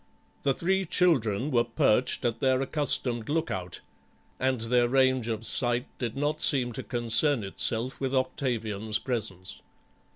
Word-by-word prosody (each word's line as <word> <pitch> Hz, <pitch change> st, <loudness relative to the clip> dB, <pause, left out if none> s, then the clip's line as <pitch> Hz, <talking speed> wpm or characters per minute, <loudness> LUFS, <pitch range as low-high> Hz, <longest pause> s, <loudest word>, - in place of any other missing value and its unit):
The 135 Hz, -2 st, +1 dB
three 190 Hz, +3 st, 0 dB
children 140 Hz, -, +1 dB
were 120 Hz, -2 st, +3 dB
perched 120 Hz, +1 st, +1 dB
at 115 Hz, -1 st, -1 dB
their 130 Hz, -1 st, +2 dB
accustomed 130 Hz, -4 st, 0 dB
look 160 Hz, +2 st, -1 dB
out, 90 Hz, -1 st, -5 dB, 0.6 s
and 130 Hz, -1 st, 0 dB
their 120 Hz, +1 st, +2 dB
range 130 Hz, -2 st, +2 dB
of 115 Hz, -1 st, -3 dB
sight 120 Hz, +1 st, +3 dB
did 120 Hz, 0 st, -4 dB
not 150 Hz, +2 st, -1 dB
seem 125 Hz, -4 st, +2 dB
to 115 Hz, -, -5 dB
concern 120 Hz, +2 st, +1 dB
itself 115 Hz, +6 st, -1 dB
with 135 Hz, 0 st, -1 dB
Octavian's 115 Hz, -5 st, -2 dB
presence. 105 Hz, -7 st, -4 dB
125 Hz, 140 wpm, -27 LUFS, 115-135 Hz, 0.6 s, were